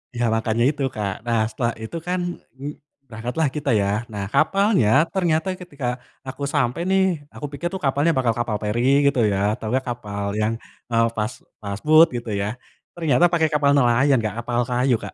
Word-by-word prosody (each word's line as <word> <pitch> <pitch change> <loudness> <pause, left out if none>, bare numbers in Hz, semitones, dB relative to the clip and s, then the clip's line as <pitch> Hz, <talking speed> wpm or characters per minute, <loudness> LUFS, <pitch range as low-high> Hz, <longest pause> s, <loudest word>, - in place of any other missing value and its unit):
Iya 120 0 0
makanya 115 +1 0
itu, 145 -1 -2
Kak. 100 -1 -3
Nah, 115 -1 +2
setelah 120 -1 -1
itu 110 +9 -5
kan 180 +1 0 0.4
ng 145 +2 -5 0.4
berangkatlah 120 +7 -1
kita, 145 -1 -2
ya. 100 - 0 0.2
Nah, 100 -1 -3
kapalnya 195 - +3 0.2
ternyata 170 -3 +1
ketika, 145 -7 -5 0.4
aku 135 +2 -6
sampai 140 +1 +1
nih 190 0 +4 0.3
aku - - -6
pikir 160 +5 -3
tuh 190 - -4
kapalnya 145 +5 +2
bakal 125 -3 +2
kapal 120 -3 -1
ferry 105 +2 -1 0.2
gitu 140 -2 +3
ya, - - 0 0.2
atau 110 - -7
enggak 130 +3 0
kapal 105 -4 -5 0.2
yang, 110 +1 +1 0.4
eee, 115 0 +4
fast 105 +3 -2 0.3
fast 100 -1 -5
boat 155 +2 +8
gitu, 120 -1 -6
ya. 100 - -1 0.5
Ternyata 165 -2 +3
pakai 160 -2 +3
kapal 145 -1 +3
nelayan, 130 +2 +4
Kak, 110 -2 -2
kapal 120 0 -1
kayu, 125 +1 +2
Kak. 100 - -7
125 Hz, 180 wpm, -22 LUFS, 115-150 Hz, 0.5 s, boat